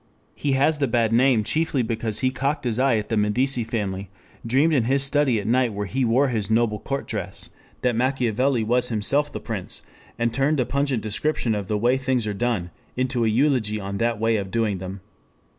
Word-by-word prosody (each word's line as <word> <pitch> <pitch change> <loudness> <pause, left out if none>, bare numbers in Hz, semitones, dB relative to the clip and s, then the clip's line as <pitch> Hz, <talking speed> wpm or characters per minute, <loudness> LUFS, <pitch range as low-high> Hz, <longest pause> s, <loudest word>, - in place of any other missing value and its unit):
He 140 -2 -1
has 145 +3 +2
the 140 - +1
bad 115 -1 +1
name 120 -2 +4
chiefly 155 +1 0
because 115 -2 -2
he 130 -1 +2
cocked 140 +3 -2
his 120 -1 -1
eye 130 -3 +3
at 105 - -4
the 115 - 0
Medici 120 +5 +2
family, 100 -4 -3 0.3
dreamed 135 +8 +2
in 130 -6 +2
his 135 +2 +2
study 140 -4 +2
at 100 - -6
night 120 0 +2
where 105 0 -3
he 130 +7 -1
wore 125 +4 +3
his 110 -4 -2
"noble 110 -1 +1
court 140 0 -4
dress" - - -4 0.3
that 125 -2 +2
Machiavelli 125 0 +1
was 125 +3 +2
himself 130 +7 +2
the - - -5
Prince, 105 -6 -4 0.3
and 120 -1 0
turned 140 +3 +1
a 125 - +2
pungent 140 -3 -1
description 115 +2 0
of 100 -3 -3
the 105 - 0
way 120 +5 +2
things 130 -3 0
are 105 - -2
done 100 -5 -2 0.3
into 130 -1 0
an 110 - +2
eulogy 120 -4 +1
on 100 0 -5
that 115 -1 0
way 115 0 +2
of 100 -2 -4
doing 110 -3 0
them. 95 +1 -7
120 Hz, 210 wpm, -23 LUFS, 110-135 Hz, 0.3 s, name